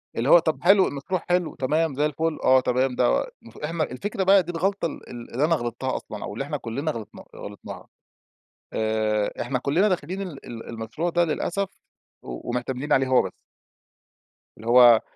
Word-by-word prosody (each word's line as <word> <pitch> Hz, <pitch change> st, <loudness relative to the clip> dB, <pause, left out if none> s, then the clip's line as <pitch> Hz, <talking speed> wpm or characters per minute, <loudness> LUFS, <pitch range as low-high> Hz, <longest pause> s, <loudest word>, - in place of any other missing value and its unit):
اللي 120 Hz, +5 st, 0 dB
هو 175 Hz, -, +9 dB
طب 160 Hz, -1 st, -2 dB
حلو 190 Hz, +1 st, +6 dB
المشروع 155 Hz, +6 st, -3 dB
حلو، 175 Hz, -2 st, +1 dB
تمام 150 Hz, +2 st, 0 dB
زي 145 Hz, -, +1 dB
الفُل، 155 Hz, +2 st, -1 dB
آه 130 Hz, 0 st, +6 dB
تمام، 125 Hz, 0 st, +1 dB
ده -, -, +2 dB, 0.2 s
المف 115 Hz, -, -15 dB
إحنا 160 Hz, +2 st, -2 dB
الفكرة 190 Hz, +9 st, -3 dB
بقى 195 Hz, 0 st, +6 dB
دي 175 Hz, -, -5 dB
الغلطة 195 Hz, +3 st, -1 dB
ال 165 Hz, -, -6 dB
ال 120 Hz, -1 st, -9 dB
اللي 135 Hz, +5 st, +2 dB
أنا 165 Hz, -, +3 dB
غلطتها 130 Hz, 0 st, -3 dB
أصلًا 105 Hz, -, -6 dB
أو -, -, -5 dB
اللي 125 Hz, +6 st, -3 dB
إحنا 150 Hz, 0 st, -3 dB
كلّنا 140 Hz, +5 st, -3 dB
غلطنا 115 Hz, -6 st, -8 dB
غلطناها. 100 Hz, -1 st, -9 dB, 0.9 s
آآ 110 Hz, -1 st, 0 dB
إحنا 125 Hz, +1 st, -1 dB
كلّنا 165 Hz, -, +2 dB
داخلين 185 Hz, +1 st, -2 dB
ال 175 Hz, -8 st, -7 dB
ال 115 Hz, -2 st, -8 dB
المشروع 115 Hz, +9 st, -3 dB
ده 175 Hz, 0 st, +2 dB
للأسف 185 Hz, +4 st, -2 dB, 0.5 s
و 60 Hz, -, -7 dB
ومعتمدين 125 Hz, +3 st, -2 dB
عليه 135 Hz, 0 st, +3 dB
هو 130 Hz, -1 st, +5 dB
بس. -, -, -5 dB, 1.3 s
اللي 110 Hz, -, -10 dB
هو 120 Hz, -2 st, +8 dB
140 Hz, 180 wpm, -24 LUFS, 120-170 Hz, 1.3 s, هو